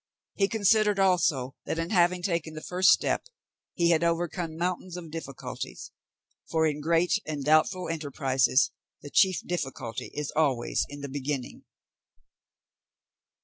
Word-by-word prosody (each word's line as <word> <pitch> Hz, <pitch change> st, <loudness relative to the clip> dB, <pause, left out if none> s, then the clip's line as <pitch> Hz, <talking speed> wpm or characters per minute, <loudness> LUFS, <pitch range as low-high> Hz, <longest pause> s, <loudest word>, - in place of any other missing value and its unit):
He 195 Hz, -, +2 dB
considered 215 Hz, -1 st, +3 dB
also, 170 Hz, -9 st, +2 dB
that -, -, -2 dB
in 165 Hz, +1 st, -2 dB
having 180 Hz, -2 st, +3 dB
taken 170 Hz, -3 st, -2 dB
the 155 Hz, -, -7 dB
first 185 Hz, +1 st, +3 dB
step, -, -, +3 dB, 0.5 s
he 170 Hz, 0 st, +3 dB
had 165 Hz, 0 st, +3 dB
overcome 170 Hz, -1 st, -1 dB
mountains 180 Hz, +1 st, -3 dB
of 165 Hz, -3 st, -9 dB
difficulties, 150 Hz, -5 st, -7 dB, 0.6 s
for 160 Hz, -1 st, +2 dB
in 150 Hz, -1 st, -1 dB
great 170 Hz, +5 st, +2 dB
and 150 Hz, -3 st, -4 dB
doubtful 155 Hz, +4 st, +3 dB
enterprises 140 Hz, -4 st, +1 dB, 0.3 s
the 145 Hz, -, -9 dB
chief 185 Hz, +5 st, +4 dB
difficulty 135 Hz, -9 st, -4 dB
is 150 Hz, -1 st, -4 dB
always 140 Hz, -6 st, +1 dB
in 145 Hz, 0 st, -8 dB
the 140 Hz, -, -4 dB
beginning. 135 Hz, -1 st, -4 dB
165 Hz, 135 wpm, -27 LUFS, 145-180 Hz, 0.6 s, chief